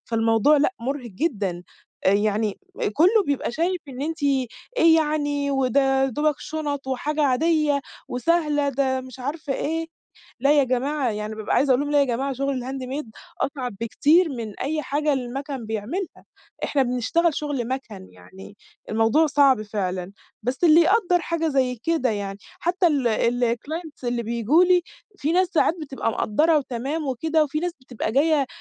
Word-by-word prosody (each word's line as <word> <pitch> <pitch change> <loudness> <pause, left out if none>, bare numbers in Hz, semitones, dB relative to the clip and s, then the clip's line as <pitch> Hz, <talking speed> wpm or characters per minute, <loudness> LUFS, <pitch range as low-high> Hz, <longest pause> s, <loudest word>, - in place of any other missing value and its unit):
فالموضوع 225 +5 +3
لأ 295 +6 +2
مُرهق 255 0 -4
جدًا، 195 - -2 0.4
يعني 205 +1 +1 0.4
كُلّه 385 +8 +5
بيبقى 285 -2 -1
شايف 350 +6 -1
إن 265 0 -6
أنتِ 320 +1 -4
إيه 285 - +2
يعني 290 -2 0
وده 270 0 +2
يا - - +2
دوبك 295 +4 0
شُنَط 290 -3 -4
وحاجة 295 +4 -1
عادية 295 +1 +2 0.3
وسهلة، 295 +1 +1
ده 265 -1 0
مش 260 0 -11
عارفة 285 +2 -4
إيه، 325 +4 -2 0.5
لأ 275 +3 +4
يا 280 - +5
جماعة، 260 +1 0
يعني 210 0 -4
بابقى 215 -1 -2
عايزه 275 +1 +2
أقول 255 0 +4
لهم 290 0 -2
"لأ 290 - +4
يا - - +4
جماعة 265 +2 -1
شغل 275 0 -2
الhandmade 265 +1 -4 0.3
أصعب 255 -6 -3
بكتير 305 +9 +3
من 230 -7 -6
أي 305 +3 -1
حاجة 295 +2 0
المَكَن 265 0 -4
بيعملها، 225 - -4 0.4
إحنا 280 - +1
بنشتغل 260 +7 +1
شغل 280 -6 -3
مَكَن 260 - -6
يعني 190 - -14 0.3
الموضوع 225 +9 +3
صعب 275 -6 +4
فعلًا." 190 -3 -3 0.3
بس 255 +8 -2
اللي 325 0 +7
يقدَّر 360 0 +3
حاجة 330 -1 -1
زي 260 -3 +1
كده 320 -7 +1
يعني، 200 -2 -4 0.2
حتى 360 +2 +1
ال 280 -7 +2 0.5
الclients 310 +2 -8
اللي 240 -1 -1
بييجوا 235 - +3
لي 360 -1 +4 0.3
في 305 -1 -1
ناس 365 +1 +3
ساعات 340 -1 +2
بتبقى 270 -6 -2
مقدّرة 305 +10 +2
وتمام 275 +4 -3
وكده، 310 +5 +1
وفي 300 +1 -3
ناس 350 +1 -2
بتبقى 245 -3 -4
جايّة 290 0 +3
275 Hz, 155 wpm, -23 LUFS, 240-310 Hz, 0.5 s, اللي